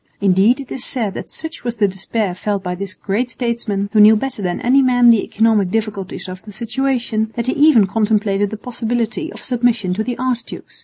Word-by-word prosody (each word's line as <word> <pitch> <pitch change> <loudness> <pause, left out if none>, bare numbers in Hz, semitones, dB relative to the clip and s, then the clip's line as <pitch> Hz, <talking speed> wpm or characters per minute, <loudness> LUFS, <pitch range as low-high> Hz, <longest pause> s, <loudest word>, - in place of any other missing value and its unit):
Indeed 200 +6 +3
it 270 - -9
is 255 - -3
said 225 -9 0
that - - -7
such 320 0 -8
was 240 -1 -3
the 210 -3 +2
despair 190 +1 -2
felt 200 +1 -3
by 180 -1 -3
this 190 +1 -6
great 220 +5 -2
statesman, 230 -5 -2
who 215 - +4
knew 210 +1 +8
better 250 0 -3
than 180 -2 -2
any 265 +3 +4
man 245 -2 +5
the 225 -3 +3
economic 220 -3 +1
difficulties 200 -3 -3
of 185 0 -8
the 215 - -11
situation, 235 0 -2
that 235 - -2
he 255 - +1
even 285 -8 +5
contemplated 205 -1 0
the 215 - -6
possibility 240 - -3
of - - -11
submission 235 -6 0
to 215 +4 -2
the 245 +1 -4
archdukes. 250 -2 -4
220 Hz, 205 wpm, -18 LUFS, 200-245 Hz, -, knew